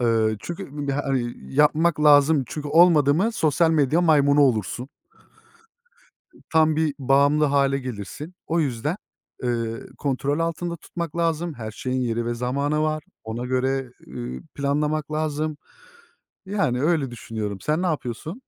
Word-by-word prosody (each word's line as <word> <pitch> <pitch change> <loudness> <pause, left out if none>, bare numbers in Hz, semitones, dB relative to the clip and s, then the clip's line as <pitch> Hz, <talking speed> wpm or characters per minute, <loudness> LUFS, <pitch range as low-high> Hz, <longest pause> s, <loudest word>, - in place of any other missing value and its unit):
Iıı, 110 -2 +2
çünkü 170 -5 -7 0.2
ya, 140 +1 -1
hani, 125 -3 -1 0.2
yapmak 150 +2 +3
lazım. 145 -1 +5
Çünkü 150 +2 -6
olmadı 155 -3 +5
mı 215 +8 +1
sosyal 160 -2 +2
medya 155 +1 +3
maymunu 145 -4 +4
olursun. 125 -1 +1 1.6
Tam 155 -1 +4
bir 155 -2 +1
bağımlı 140 +3 +3
hâle 140 -1 +2
gelirsin. 130 - -7
O 165 +1 +1
yüzden, 145 - -1 0.5
ııı, 115 -2 -2
kontrol 140 +1 -1
altında 170 +1 -2
tutmak 170 0 -6
lazım. 165 -1 0
Her 110 -3 -6
şeyin 130 +4 -3
yeri 120 -1 -1
ve 120 - -1
zamanı 140 +5 -1
var. 155 0 -1 0.2
Ona 115 +2 -4
göre, 130 0 -1 0.2
ııı, 65 +1 -6
planlamak 150 +2 -1
lazım. 155 0 -2 0.9
Yani 155 -11 0
öyle 150 -4 +1
düşünüyorum. 110 -4 -5
Sen 155 +3 0
ne 185 - +1
yapıyorsun? 155 - -4
145 Hz, 135 wpm, -23 LUFS, 125-155 Hz, 1.6 s, lazım